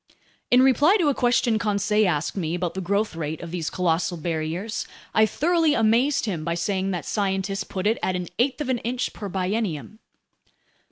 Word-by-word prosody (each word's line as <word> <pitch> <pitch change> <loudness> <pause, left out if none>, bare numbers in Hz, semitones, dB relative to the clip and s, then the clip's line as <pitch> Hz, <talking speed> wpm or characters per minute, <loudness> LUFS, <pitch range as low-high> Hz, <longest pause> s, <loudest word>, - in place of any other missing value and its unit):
In 250 +1 +6
reply 290 - +5
to 335 -7 +2
a - - +2
question 240 -3 +2
Conseil 210 0 +1
asked 155 -3 -1
me 170 -4 -2
about 175 -1 -2
the 190 - -4
growth 200 +2 0
rate 160 -1 -4
of 170 - -7
these 170 -3 -2
colossal 170 -1 0
barriers, 165 +6 -3 0.3
I 220 0 +5
thoroughly 325 +3 +2
amazed 235 +6 +2
him 175 -8 -3
by 170 +1 -1
saying 190 +2 -1
that 175 -6 -3
scientists 195 -1 -1
put 185 0 -5
it 220 +2 +2
at 185 - 0
an 180 -1 -4
eighth 265 +4 +1
of 280 - -3
an 250 -2 +1
inch 245 +2 -2
per 205 -2 -6
biennium. 190 0 -2
200 Hz, 185 wpm, -24 LUFS, 175-235 Hz, 0.3 s, In